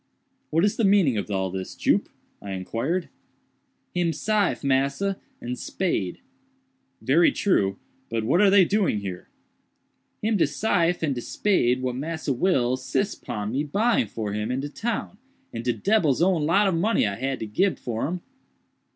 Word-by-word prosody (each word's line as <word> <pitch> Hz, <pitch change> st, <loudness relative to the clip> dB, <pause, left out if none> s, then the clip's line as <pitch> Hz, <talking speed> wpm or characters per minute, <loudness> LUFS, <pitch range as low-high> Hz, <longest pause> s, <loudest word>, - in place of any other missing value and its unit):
"What 165 Hz, +4 st, +3 dB
is 205 Hz, -, 0 dB
the 230 Hz, -, +1 dB
meaning 195 Hz, -, +4 dB
of 100 Hz, -, -5 dB
all 95 Hz, -2 st, -1 dB
this, 95 Hz, 0 st, -5 dB
Jup?" -, -, +1 dB, 0.3 s
I 100 Hz, -1 st, -6 dB
inquired. 115 Hz, -, -2 dB, 0.9 s
"Him 175 Hz, -2 st, +1 dB
syfe, 210 Hz, -3 st, 0 dB
massa, 140 Hz, +9 st, +1 dB, 0.2 s
and 125 Hz, +1 st, -5 dB
spade." 110 Hz, -, -2 dB, 0.8 s
"Very 160 Hz, +7 st, +4 dB
true; 100 Hz, -, +1 dB, 0.3 s
but 115 Hz, -1 st, -1 dB
what 145 Hz, -, +3 dB
are 205 Hz, -, +6 dB
they 195 Hz, -2 st, +6 dB
doing 195 Hz, -, +1 dB
here?" 95 Hz, -3 st, -7 dB, 0.9 s
"Him 215 Hz, 0 st, +2 dB
de 165 Hz, -, +3 dB
syfe 175 Hz, +2 st, +1 dB
and 145 Hz, -3 st, +1 dB
de 120 Hz, -, -4 dB
spade 130 Hz, -, +1 dB
what 125 Hz, -1 st, -1 dB
Massa 160 Hz, +1 st, -2 dB
Will 130 Hz, -4 st, +1 dB
sis 130 Hz, +11 st, -1 dB
pon 105 Hz, -3 st, -5 dB
my 135 Hz, -, +1 dB
buying 200 Hz, -, +1 dB
for 105 Hz, -1 st, -4 dB
him 105 Hz, +2 st, -2 dB
in 125 Hz, +1 st, -1 dB
de 145 Hz, -, -4 dB
town, 220 Hz, +2 st, -4 dB, 0.3 s
and 115 Hz, -, -4 dB
de 120 Hz, -, +1 dB
debbil's 175 Hz, -, +2 dB
own 175 Hz, -5 st, +2 dB
lot 200 Hz, +5 st, +4 dB
of 190 Hz, -, +1 dB
money 185 Hz, -, +2 dB
I 100 Hz, -, -1 dB
had 135 Hz, +5 st, -3 dB
to -, -, -2 dB
gib 185 Hz, -, +1 dB
for 115 Hz, +1 st, -3 dB
'em." 175 Hz, +2 st, -4 dB
145 Hz, 170 wpm, -25 LUFS, 115-190 Hz, 0.9 s, are